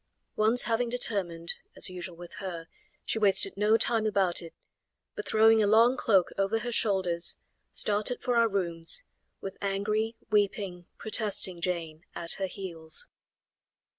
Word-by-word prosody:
Once 220 +3 +4
having 235 +1 -1
determined, 185 -9 -1 0.2
as - - +2
usual 180 -1 -7
with 175 0 -12
her, 170 -4 -7 0.4
she 225 - -2
wasted 195 -2 +4
no 210 +2 +3
time 225 -2 +2
about 195 -4 +2
it, 165 -1 -12 0.6
but - - -7
throwing 220 0 +4
a 205 - +2
long 230 +4 +4
cloak 195 -8 +2
over 195 +3 +1
her 240 +2 -4
shoulders, 190 -6 0 0.3
started 210 +4 +2
for 245 -1 -2
our 230 -1 +3
rooms, 170 - -2 0.4
with 195 - -8
angry, 210 +3 -2 0.2
weeping, 200 -4 -1
protesting 205 -5 +1
Jane 165 -2 -4
at 165 -1 +1
her 190 - 0
heels. 180 - -3
200 Hz, 140 wpm, -28 LUFS, 175-220 Hz, 0.6 s, Once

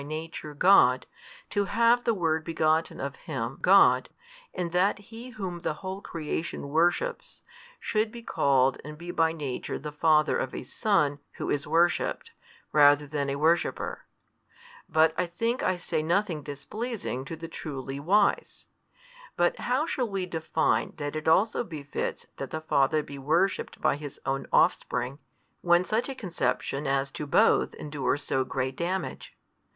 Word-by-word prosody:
Nature 155 0 -6
God, 145 -7 +5 0.5
to 205 -1 +1
have 235 +4 +3
the 230 - +3
Word 160 -4 0
begotten 160 0 0
of - - -4
Him - - -5
God, - - +5 0.4
and 175 -2 -3
that 180 +3 +2
He 225 +4 -11
Whom 190 -7 -5
the 155 - -2
whole 190 +3 -6
creation 160 -3 -4
worships, 175 - 0 0.4
should 215 0 0
be 235 0 -10
called 135 - +2
and 150 +2 -8
be 175 +2 -6
by 165 -1 +2
Nature 145 -6 -4
the 150 +2 -6
Father 155 0 +3
of 130 - -3
a - - -5
Son 150 - +1
Who - - -4
is 145 -1 -1
worshipped, 170 - +1 0.4
rather 145 0 +6
than 140 -1 -2
a 140 - -1
worshipper? 160 +4 0 0.8
But 160 0 +4
I 180 - +1
think 230 +8 -1
I 185 - +1
say 170 -2 -2
nothing 170 0 0
displeasing 145 - -5
to 165 - -6
the 165 +1 -8
truly 135 -4 -6
wise. 200 +7 +1 0.7
But 175 0 +2
how 255 +5 0
shall 255 -7 -2
we 195 -2 -2
define 160 -3 0
that 145 0 -4
it 155 0 -4
also 200 +9 +3
befits 150 -8 -5
that 135 - -5
the 155 - -4
Father 155 0 +2
be 140 -1 -9
worshipped 165 +8 0
by - - +2
His 145 -2 -8
Own 135 0 -2
offspring, 125 +4 +1 0.4
when 175 +1 +4
such 220 +8 0
a 270 - -4
conception 145 - -2
as 135 0 0
to 150 - -5
Both - - +3
endures 145 -1 -2
so 130 - 0
great 130 0 -3
damage? 180 +4 -4
160 Hz, 155 wpm, -27 LUFS, 145-190 Hz, 0.8 s, rather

